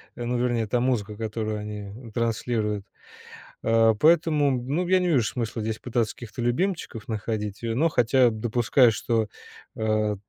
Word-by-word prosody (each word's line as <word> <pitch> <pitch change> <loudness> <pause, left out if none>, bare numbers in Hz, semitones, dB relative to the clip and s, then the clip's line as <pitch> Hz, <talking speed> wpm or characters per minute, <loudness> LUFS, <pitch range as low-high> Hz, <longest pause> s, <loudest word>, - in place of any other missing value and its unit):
Э, 120 - -6
ну, 120 +1 -1
вернее, 120 -2 +1
та 120 +3 0
музыка, 110 -5 0
которую 110 -1 -3
они, 105 +2 -8
транслируют. 110 -2 -1 0.8
А, 115 0 +4
поэтому, 155 +2 +3
ну, 150 +9 -2
я 185 - +4
не 180 - 0
вижу 130 -8 +3
смысла 115 +1 -3
здесь 110 +1 -2
пытаться 120 -3 -1
каких-то 120 0 -8
любимчиков 130 - -1
находить. 105 -1 -4
Э, 115 -1 -1
но 160 +7 +3
хотя 125 -2 +3
допускаю, 120 +2 +3
что, 110 0 0 0.5
э, 110 -1 0
115 Hz, 150 wpm, -25 LUFS, 110-125 Hz, 0.8 s, А